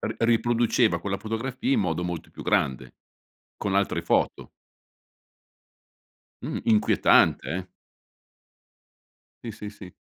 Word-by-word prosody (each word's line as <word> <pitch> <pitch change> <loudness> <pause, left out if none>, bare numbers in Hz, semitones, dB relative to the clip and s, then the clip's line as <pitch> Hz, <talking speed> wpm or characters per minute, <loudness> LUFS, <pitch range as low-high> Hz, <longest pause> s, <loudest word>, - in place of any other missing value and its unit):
ri 110 0 -3
riproduceva 115 -3 +2
quella 100 +2 -3
fotografia 120 - -3
in 250 - +3
modo 90 - -1
molto 90 -2 -5
più - - -10
grande, 65 -1 0 0.6
con 100 -2 -2
altre 100 -4 +1
foto. 85 - 0 1.9
Mh, - - -4
inquietante 105 - +3
eh. 90 +5 -3 1.8
Sì, 115 - -5
sì, 105 0 -8
sì. 95 -4 -12
105 Hz, 105 wpm, -25 LUFS, 90-115 Hz, 1.9 s, in